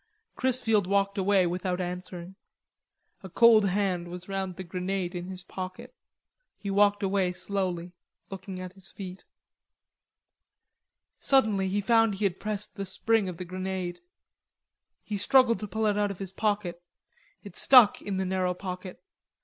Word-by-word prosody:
Chrisfield 235 -6 +2
walked 200 +1 +1
away 190 -1 +3
without 180 +1 -2
answering. 180 0 -6 0.9
A 190 - -9
cold 225 +1 +6
hand 185 -3 0
was 180 +1 -8
round 190 -2 -3
the 190 - -6
grenade 180 +1 -3
in 175 0 -5
his 185 -1 -4
pocket. 185 0 -7 0.6
He 200 - -5
walked 205 +1 +3
away 190 -2 +1
slowly, 180 -2 -3 0.4
looking 190 -1 -7
at 185 0 -7
his 190 -2 -10
feet. 185 -1 -9 1.9
Suddenly 215 -8 +3
he 200 +2 0
found 225 -1 +3
he 205 +2 -1
had 185 -2 -1
pressed 210 0 -3
the 195 - -3
spring 215 +1 +1
of 175 - -7
the 180 - -6
grenade. 185 0 -4 1.0
He 210 - -3
struggled 255 +1 +4
to 210 - -5
pull 220 +3 -2
it 210 -1 +2
out 205 0 +1
of 200 - -6
his 190 -1 -5
pocket. 200 -4 -1 0.6
It - - -11
stuck 250 -6 +6
in 200 -2 -3
the 190 - -1
narrow 185 -1 0
pocket. 185 0 -7
190 Hz, 150 wpm, -28 LUFS, 180-205 Hz, 1.9 s, cold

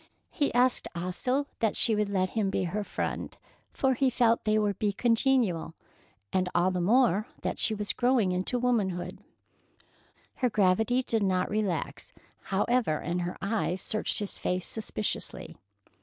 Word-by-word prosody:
He 290 -4 0
asked 250 +1 +3
also 215 +11 -1
that 225 -3 +1
she 225 - +5
would 210 -1 0
let 185 -2 0
him 215 -3 0
be 190 - -1
her 195 +4 -2
friend, - - -4 0.3
for 265 -1 +1
he 265 +1 +2
felt 235 -2 +3
that - - -43
they 215 - +3
would 205 -2 0
be 205 -2 +1
congenial, 230 - +1 0.6
and 185 -1 +1
all 175 +2 +3
the 180 -1 -1
more 215 +1 +3 0.2
that - - -2
she 220 - +2
was 210 0 -2
growing 245 -6 +2
into 185 +7 -1
womanhood. 215 -8 -1 1.2
Her 250 - +1
gravity 220 +5 +2
did 225 -3 -1
not 185 -2 +1
relax, 210 - -2 0.3
however, 205 -3 +1
and 175 +4 -2
her 175 +1 -4
eyes 200 -3 -1
searched 215 +3 -1
his 205 -2 -2
face 180 0 -1
suspiciously. 215 -1 -4
210 Hz, 155 wpm, -28 LUFS, 185-240 Hz, 1.2 s, she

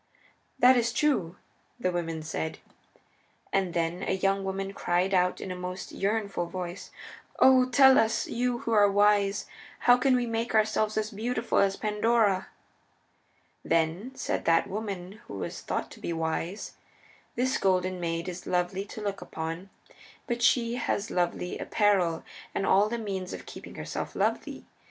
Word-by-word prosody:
"That 250 +1 +6
is 235 -1 +1
true," 235 - +1 0.4
the 185 -6 0
women 165 -2 -3
said. 160 0 -3 1.0
And 190 -3 0
then 170 +2 -1
a - - -1
young 195 +1 +1
woman 195 0 -3
cried 180 +1 0
out 180 -1 +2
in 190 - -5
a - - -4
most 180 +1 -6
yearnful 200 -3 -1
voice, 180 +1 -6 0.5
"O 255 -1 +6
tell 265 +1 +7
us, 220 0 +1
you 245 +1 -1
who 230 - -3
are 205 -2 +5
wise, 205 0 +3 0.4
how 245 0 +6
can 255 +1 +3
we 245 -1 +1
make 230 0 -2
ourselves 215 0 +2
as 215 +1 -1
beautiful 230 +2 -1
as 195 -1 +3
Pandora!" 210 -2 +1 1.2
Then 165 +8 0
said - - -2
that 165 0 +4
woman 200 0 -5
who - - -7
was - - -5
thought - - -3
to - - -12
be - - -4
wise, 165 +4 -3 0.6
"This 255 +2 +1
Golden 185 -1 +1
Maid 165 0 -2
is 180 0 -6
Lovely 180 +2 0
to 215 - -9
look 200 -1 -3
upon 165 +4 -5 0.6
because 240 -1 -2
she 235 -1 +3
has 220 -3 -2
lovely 180 0 -1
apparel 190 -6 +2 0.3
and 195 - 0
all 200 +3 +4
the 235 - -2
means 195 -5 -4
of - - -8
keeping - - -10
herself - - -5
lovely. - - -1
195 Hz, 155 wpm, -28 LUFS, 180-225 Hz, 1.2 s, tell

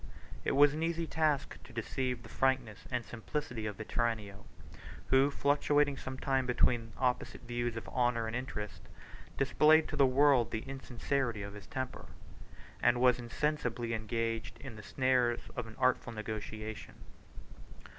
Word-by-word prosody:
It - - 0
was 145 +1 +6
an 155 - -3
easy 165 0 0
task 155 -3 0
to - - -14
deceive 125 +1 -2
the - - -10
frankness 130 -6 0
and 125 -2 -2
simplicity 120 -1 -4
of 105 - -4
Vetranio, 110 -3 -2 0.6
who, 135 +1 +5
fluctuating 145 0 +2
some 130 -1 -6
time 135 -1 0
between 120 -2 +2
the - - -17
opposite 125 -1 -1
views 120 -1 -2
of 115 - -6
honor 120 -2 +1
and 110 +1 -3
interest, 105 -8 -5 0.6
displayed 155 +3 +5
to - - -3
the 140 -2 +5
world 130 -2 +4
the 110 +4 -4
insincerity 130 -3 -2
of 100 0 -6
his 100 -2 -11
temper, 130 +2 -5 0.7
and 120 0 +4
was 125 -1 +5
insensibly 120 -2 -1
engaged 115 +1 -2
in 135 -5 -8
the 105 - -9
snares 125 0 +2
of 120 -2 -3
an 110 - -11
artful 130 -2 +2
negotiation. 110 0 -6
125 Hz, 150 wpm, -33 LUFS, 115-135 Hz, 0.7 s, was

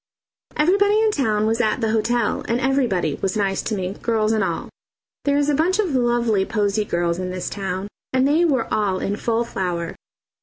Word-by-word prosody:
Everybody 405 +6 +3
in 440 -1 +3
town 215 - +1
was 225 +2 +1
at 215 0 +1
the 225 -2 0
hotel, 225 0 0
and 235 +1 0
everybody 245 - +1
was 195 +1 -1
nice 195 -2 0
to 220 - -2
me, 185 -1 -3
girls 220 -2 +1
and 220 -2 +1
all. - - -2 0.6
There 285 0 +2
is 290 0 +2
a 295 - +2
bunch 330 +6 +2
of 390 -8 0
lovely 240 -5 +2
posy 210 0 0
girls 170 -2 -1
in 185 0 -3
this 185 0 -4
town, 195 -1 -3 0.2
and 260 +1 +2
they 310 +4 +3
were 275 -8 +2
all 205 -3 +1
in 200 +2 -2
full 230 +2 0
flower. 180 -7 -3
225 Hz, 195 wpm, -22 LUFS, 195-265 Hz, 0.6 s, Everybody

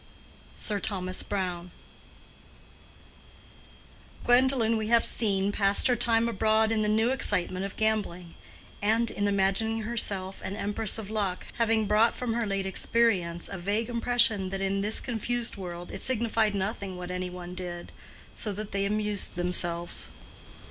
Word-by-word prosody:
—SIR 210 -2 -1
THOMAS 185 -3 0
BROWNE. 180 -3 -3 2.5
Gwendolen, 245 -2 +4
we 220 -1 -2
have 235 +1 +4
seen, 200 -3 +2
passed 200 0 +3
her 250 - +4
time 230 -1 +2
abroad 220 0 +2
in 220 -1 +1
the 210 - +1
new 220 +3 +2
excitement 185 -7 0
of 200 - -13
gambling, 205 -6 -1 0.5
and 225 +3 +2
in 205 - -1
imagining 200 +3 +1
herself 200 -4 -2
an 195 - -5
empress 205 +1 -1
of 215 -2 -7
luck, 200 -4 -2
having 225 -1 +2
brought 215 +3 +3
from 245 -2 -2
her 235 -1 -1
late 195 -1 -1
experience 190 -4 +1
a 195 - -6
vague 205 +6 -1
impression 235 -5 +2
that 195 +1 -3
in 195 0 0
this 210 +2 +1
confused 240 0 -2
world 175 -2 -7
it - - -7
signified 225 -4 +1
nothing 195 -1 -3
what 180 0 -6
any 180 0 -3
one 180 0 -8
did, 175 -1 -6 0.4
so 215 - -3
that 210 +1 -6
they 195 0 0
amused 210 -1 -2
themselves. 175 -1 +1
205 Hz, 150 wpm, -28 LUFS, 190-225 Hz, 2.5 s, Gwendolen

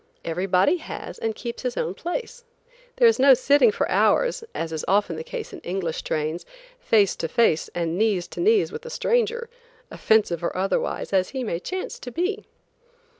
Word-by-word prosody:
Everybody 180 - +2
has, 320 - -8
and 225 -1 -2
keeps 235 -1 -6
his 250 -2 -3
own 175 - -1
place. 470 - -5 0.5
There 480 - +5
is 455 - +3
no 270 0 +7
sitting 285 - +4
for 475 - -1
hours, - - +2
as 165 0 -3
is 155 - -3
often 195 -3 +2
the 160 - -5
case - - -7
in - - -8
English 175 -3 -3
trains, 155 +3 -2 0.4
face 210 - +3
to 165 - -2
face 165 -6 +2
and 170 +1 -1
knees 205 -5 +1
to - - -9
knees 420 +4 +3
with 460 +2 -7
a 480 - -8
stranger, 475 -1 0 0.4
offensive 210 -7 +1
or 170 - -2
otherwise, 195 +1 -1
as 185 -1 +2
he 265 -2 -4
may 170 -7 -2
chance 370 - -5
to 250 - -7
be. 385 - -2
225 Hz, 180 wpm, -24 LUFS, -, 0.5 s, no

